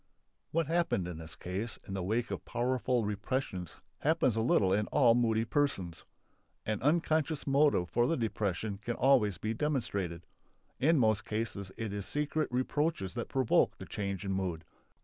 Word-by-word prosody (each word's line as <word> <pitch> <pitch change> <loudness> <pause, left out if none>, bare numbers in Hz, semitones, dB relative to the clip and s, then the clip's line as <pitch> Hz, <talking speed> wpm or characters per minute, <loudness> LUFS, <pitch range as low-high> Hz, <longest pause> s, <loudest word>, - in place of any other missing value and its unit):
What 165 0 +1
happened 165 - +1
in 85 -3 -6
this 80 0 -7
case 100 +6 -4
in 95 - -5
the 95 - -2
wake 110 +6 -1
of - - -4
powerful 125 -1 0
repressions 105 -3 -3 0.2
happens 145 -6 +2
a 115 - +1
little 100 -5 +3
in 105 +1 +1
all 120 -4 +5
moody 115 -2 +2
persons. 110 - -1 0.6
An 110 0 -1
unconscious 155 +1 +1
motive 140 -10 +3
for 120 +7 +2
the 165 - +1
depression 105 -3 -2
can 120 +3 -3
always 125 -8 +3
be 110 +5 -2
demonstrated. 110 - -2 0.5
In 160 +4 +4
most 110 -3 +2
instances 105 -3 -2
it 110 -3 -3
is 100 -1 -4
secret 150 0 -1
reproaches 130 - 0
that 120 -2 -4
provoke 130 -3 +2
the - - -8
change 100 -1 -4
in 95 - -1
mood. 90 -4 -2
115 Hz, 165 wpm, -32 LUFS, 100-135 Hz, 0.6 s, all